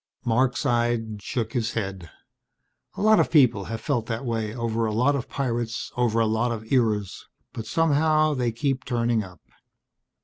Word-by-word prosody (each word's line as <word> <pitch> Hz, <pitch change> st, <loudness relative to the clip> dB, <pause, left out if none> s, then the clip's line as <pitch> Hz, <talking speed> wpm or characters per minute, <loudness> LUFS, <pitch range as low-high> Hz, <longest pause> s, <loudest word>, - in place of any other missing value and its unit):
Marc 125 Hz, +2 st, +2 dB
sighed, 120 Hz, -3 st, 0 dB
shook 115 Hz, +2 st, -3 dB
his 120 Hz, -1 st, -1 dB
head. 95 Hz, -6 st, -4 dB, 0.9 s
"A -, -, -2 dB
lot 215 Hz, 0 st, +6 dB
of -, -, +2 dB
people 120 Hz, -, +4 dB
have 115 Hz, +2 st, -5 dB
felt 115 Hz, -2 st, -1 dB
that 115 Hz, +3 st, -3 dB
way 115 Hz, -3 st, -2 dB
over 115 Hz, -1 st, -1 dB
a -, -, -1 dB
lot 125 Hz, +7 st, +2 dB
of 130 Hz, -3 st, -4 dB
pirates 120 Hz, -4 st, -3 dB
over 120 Hz, -2 st, +1 dB
a 115 Hz, -, +3 dB
lot 110 Hz, +2 st, 0 dB
of 110 Hz, -1 st, -6 dB
eras. 105 Hz, -6 st, 0 dB, 0.3 s
But 110 Hz, -1 st, -6 dB
somehow 155 Hz, +1 st, +2 dB
they 125 Hz, -4 st, 0 dB
keep 130 Hz, +3 st, -1 dB
turning 120 Hz, -2 st, 0 dB
up." 90 Hz, -4 st, -13 dB
115 Hz, 170 wpm, -25 LUFS, 110-130 Hz, 0.9 s, lot